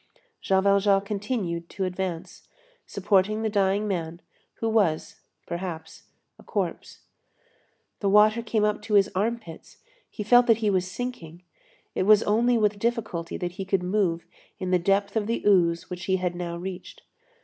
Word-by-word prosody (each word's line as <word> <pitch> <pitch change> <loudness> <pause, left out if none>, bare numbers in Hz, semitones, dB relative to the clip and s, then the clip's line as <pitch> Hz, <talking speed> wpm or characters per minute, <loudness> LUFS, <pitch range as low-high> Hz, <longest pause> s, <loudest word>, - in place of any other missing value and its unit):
Jean 190 0 +2
Valjean 200 0 +4
continued 200 -4 -3
to 195 - -4
advance, 180 -2 -5 0.4
supporting 200 +2 +1
the 220 - -1
dying 200 +1 +1
man, 170 -3 -3 0.4
who 225 - -3
was, 205 -8 0 0.3
perhaps, 170 -2 -6 0.3
a - - -15
corpse. - - -4 1.0
The 200 - 0
water 215 +3 +5
came 220 -1 -1
up 210 0 0
to 210 0 -1
his 200 0 +4
arm 220 +5 0
pits; 165 -8 -13 0.3
he 210 - -6
felt 245 +3 +5
that 230 -2 +5
he 215 -2 0
was 185 -1 0
sinking; 180 -8 -7 0.5
it - - -1
was 215 0 +6
only 235 +3 +2
with 210 -2 +1
difficulty 220 -8 -2
that 175 -1 -3
he - - -1
could 190 -1 0
move 180 -3 0 0.3
in 185 -1 -4
the 180 - +3
depth 200 +3 +1
of 220 -1 -1
ooze 185 -6 +2
which 180 0 -6
he 190 - +1
had 180 -1 -1
now 175 -1 -5
reached. 180 +1 -8
195 Hz, 160 wpm, -25 LUFS, 180-215 Hz, 1.0 s, was